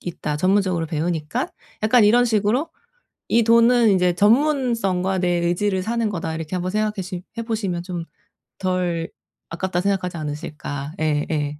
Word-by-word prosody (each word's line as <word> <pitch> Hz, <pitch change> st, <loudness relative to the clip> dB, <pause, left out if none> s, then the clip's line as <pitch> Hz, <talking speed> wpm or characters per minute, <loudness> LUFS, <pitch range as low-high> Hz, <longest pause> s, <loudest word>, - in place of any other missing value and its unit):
있다. 155 Hz, -3 st, -4 dB
전문적으로 185 Hz, -2 st, +1 dB
배우니까. 165 Hz, -, -2 dB, 0.4 s
약간 225 Hz, 0 st, +5 dB
이런 240 Hz, +4 st, +5 dB
식으로 220 Hz, +7 st, +1 dB, 0.6 s
'이 235 Hz, -, +4 dB
돈은 230 Hz, 0 st, +5 dB
인제 180 Hz, -2 st, +3 dB
전문성과 225 Hz, -6 st, +2 dB
내 180 Hz, -1 st, +1 dB, 0.2 s
의지를 190 Hz, +2 st, 0 dB
사는 230 Hz, 0 st, 0 dB
거다.' 165 Hz, -4 st, -3 dB
이렇게 160 Hz, +2 st, -4 dB
한번 180 Hz, +1 st, -2 dB
생각해시 200 Hz, -4 st, -2 dB, 0.2 s
해보시면 215 Hz, -7 st, -2 dB
좀 175 Hz, -2 st, -5 dB, 0.5 s
덜 180 Hz, -3 st, -1 dB, 0.4 s
아깝다고 180 Hz, +1 st, -2 dB
생각하지 185 Hz, -3 st, -1 dB
않으실까. 150 Hz, -1 st, -5 dB
예예. 150 Hz, -1 st, -1 dB
185 Hz, 330 characters per minute, -22 LUFS, 165-215 Hz, 0.6 s, 약간